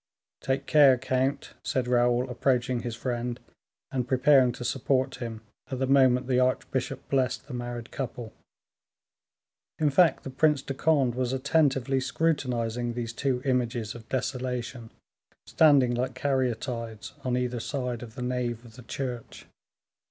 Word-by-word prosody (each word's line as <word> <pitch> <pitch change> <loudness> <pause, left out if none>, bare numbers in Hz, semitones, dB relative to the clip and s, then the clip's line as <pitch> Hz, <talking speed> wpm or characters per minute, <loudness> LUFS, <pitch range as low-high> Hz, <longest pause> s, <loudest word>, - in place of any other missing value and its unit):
"Take 135 +1 -1
care, 140 -4 +6
count," 130 +2 -1
said 130 -2 -1
Raoul, 120 0 +2
approaching 125 0 0
his 120 -1 -4
friend, 120 0 -3 0.5
and 125 -2 -2
preparing 130 -1 +5
to 120 - -7
support 130 +1 0
him 115 -2 -6 0.3
at 130 - -3
the 130 - 0
moment 130 -2 +4
the 125 -1 +2
archbishop 130 0 -1
blessed 130 -2 0
the 140 - -8
married 120 -1 -5
couple. 120 -4 -5 1.4
In 150 -2 +2
fact, 165 +4 +4
the 135 - -6
Prince 145 +1 +2
of 135 - -4
Conde 140 -6 +2
was 125 +1 -1
attentively 135 -1 +2
scrutinizing 125 -4 -1
these 120 -1 -4
two 125 +1 -1
images 120 -4 0
of 115 -1 -12
desolation, 125 -2 -3 0.6
standing 140 -6 +4
like 125 +1 -2
caryatides 125 -5 -2
on 125 -1 0
either 125 -1 -1
side 125 -2 -3
of 115 -2 -10
the 125 - -5
nave 125 -2 -2
of 115 -1 -14
the - - -10
church. 125 0 -6
125 Hz, 145 wpm, -27 LUFS, 120-135 Hz, 1.4 s, care